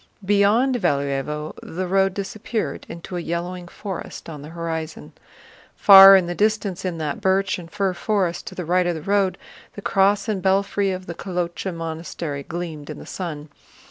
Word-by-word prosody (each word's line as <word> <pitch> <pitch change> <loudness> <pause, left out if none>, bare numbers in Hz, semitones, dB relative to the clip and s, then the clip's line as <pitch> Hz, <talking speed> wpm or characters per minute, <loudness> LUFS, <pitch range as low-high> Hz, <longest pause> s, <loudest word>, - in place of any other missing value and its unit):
Beyond 210 +6 +3
Valúevo 145 - -1
the 185 +3 -4
road 195 +1 +2
disappeared 215 +3 -4
into 170 +2 -7
a - - -2
yellowing 175 +2 -4
forest 190 -2 -7
on 150 -2 -8
the 150 - -9
horizon. 165 -1 -5 0.6
Far 195 -1 +10
in 190 -2 +4
the 175 - -3
distance 205 -2 0
in 180 -3 -3
that 155 +4 -3
birch 190 -1 +1
and 170 -1 -10
fir 195 0 -1
forest 185 -3 -1
to - - -7
the 180 - -4
right 180 +2 +2
of 175 - 0
the 155 - -7
road, 195 -1 +1 0.4
the 205 - -7
cross 200 +2 +2
and 205 -4 -1
belfry 195 +1 +1
of 185 0 -4
the 170 - -6
Kolochá 180 +1 -3
Monastery 165 -3 -5
gleamed 160 -1 -6
in - - -6
the - - -10
sun. 155 -5 -6
180 Hz, 175 wpm, -22 LUFS, 165-195 Hz, 0.6 s, Far